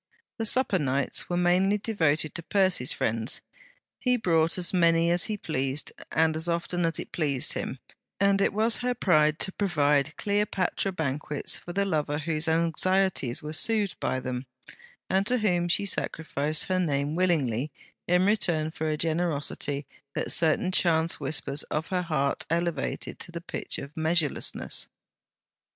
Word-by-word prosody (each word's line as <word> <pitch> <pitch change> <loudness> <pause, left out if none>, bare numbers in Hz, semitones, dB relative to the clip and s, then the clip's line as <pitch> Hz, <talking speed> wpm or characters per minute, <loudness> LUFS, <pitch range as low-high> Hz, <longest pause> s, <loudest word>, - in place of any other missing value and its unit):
The 225 - +1
supper 230 -6 +3
nights 140 -2 +1
were 175 - 0
mainly 180 +3 +3
devoted 160 -8 0
to 170 - -3
Percy's 185 -6 +1
friends. 115 +2 0 0.6
He 250 -1 +2
brought 165 -6 +2
as 180 0 0
many 170 -1 +4
as 175 0 +3
he 215 -1 -2
pleased, 135 -5 -2 0.2
and 160 -1 +2
as 160 +2 -1
often 170 0 0
as 165 - -2
it - - -6
pleased 140 -6 +1
him; - - -4 0.4
and 200 0 +3
it - - +3
was 220 +3 +1
her 250 0 -1
pride 155 -8 +3
to 190 - +1
provide 150 -7 +1
Cleopatra 200 -2 0
banquets 150 -3 -3
for 175 - -7
the 200 +2 0
lover 150 -5 0
whose 155 0 -1
anxieties 170 -3 +1
were 150 +1 -5
soothed 205 +4 0
by 130 - -1
them, 125 0 -4 0.6
and 190 +2 +1
to 250 - +2
whom 180 -6 +1
she 175 +3 +1
sacrificed 155 -5 -2
her 185 -1 0
name 145 -4 0
willingly 155 -7 +1 0.4
in 180 +1 +3
return 170 -7 +1
for 160 -1 -2
a 155 - 0
generosity 155 -3 -1 0.3
that - - -2
certain 170 +2 +3
chance 165 -2 +2
whispers 145 0 -1
of 155 +1 -2
her 185 -1 0
heart 155 -5 -1
elevated 170 -3 -2
to 175 - -4
the 170 - -5
pitch 170 - -5
of 140 +2 -8
measureless. 160 -1 -1
165 Hz, 155 wpm, -27 LUFS, 150-185 Hz, 0.6 s, many